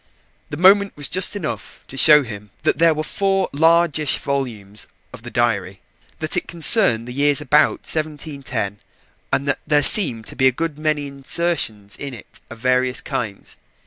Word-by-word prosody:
The 145 - -7
moment 195 +2 +3
was 145 -2 -3
just 185 +4 +1
enough 115 - -7
to - - -10
show 150 +2 +6
him 105 -3 -11
that - - 0
there 165 -1 +3
were 155 - -4
four 195 +3 -2
largish 160 -1 +2
volumes 110 -8 -4 0.3
of 125 - -12
the 120 - -10
diary 100 -6 -2 0.4
that 155 0 -3
it - - -3
concerned 165 - +3
the 125 - -8
years 145 +2 +1
about 150 0 +1
1710, 145 -9 -4 0.5
and 140 - -2
that 140 - -1
there 145 -1 +2
seemed 130 - +8
to - - -6
be 130 - +2
a - - +3
good 150 +3 -5
many 155 -2 -2
insertions 140 -7 -2
in 140 -3 -8
it 115 - -13
of 115 - -11
various 125 +1 0
kinds. 105 -5 -7
140 Hz, 170 wpm, -19 LUFS, 120-160 Hz, 0.5 s, seemed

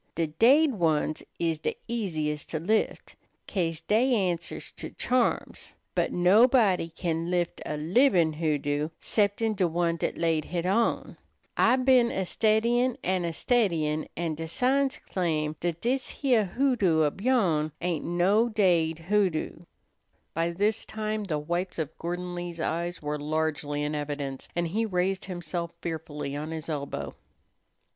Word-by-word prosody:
De 165 - +1
daid 265 - +4
ones 160 -5 0 0.2
is 165 -2 0
de - - -2
easiest 155 -10 -2
to 160 - -2
lift, 215 +7 -1 0.3
'ca'se 165 -4 -1
dey 240 +4 +3
answers 180 -5 -2
to - - -8
charms; 250 -1 -1 0.2
but - - 0
nobody 195 -1 +4
can 165 0 -2
lift 175 -1 -1
a 150 - -3
libin' 170 - +3
hoodoo 150 -1 -1
'ceptin' 215 +1 +1
de 190 -3 +1
one 170 0 0
dat - - -2
laid 165 -2 +1
hit 175 -1 -3
on. 225 +5 0 0.4
I 240 - +4
been 255 -2 +4
a 190 -4 -2
steddyin' 235 +5 +2
an' 185 -1 0
a 170 - -1
steddyin', 165 -7 +1
an' 170 -1 -1
de 160 +1 -5
signs 265 +7 +1
claim 155 -4 -1
dat 170 -1 -2
dis 260 +2 0
heah 245 -7 +2
hoodoo 195 - +2
ob 150 +5 -1
yourn 185 -11 +2
ain't 175 -2 -2
no 190 +7 +2
daid 175 -7 +2
hoodoo." 175 -2 -1 0.7
By 165 +1 0
this 205 +5 0
time 215 -1 -3
the 160 -6 -1
whites 175 +5 -3
of 160 -1 -3
Gordon 175 +1 -4
Lee's 175 -1 -5
eyes 170 +1 -2
were 150 0 -2
largely 150 -1 -1
in 150 +1 -2
evidence, 145 -2 -4
and 170 -1 0
he 220 +6 0
raised 190 -2 -1
himself 175 -2 -4
fearfully 150 -4 -5
on 150 +2 -4
his 160 0 -6
elbow. 140 -3 -4
175 Hz, 150 wpm, -27 LUFS, 160-215 Hz, 0.7 s, daid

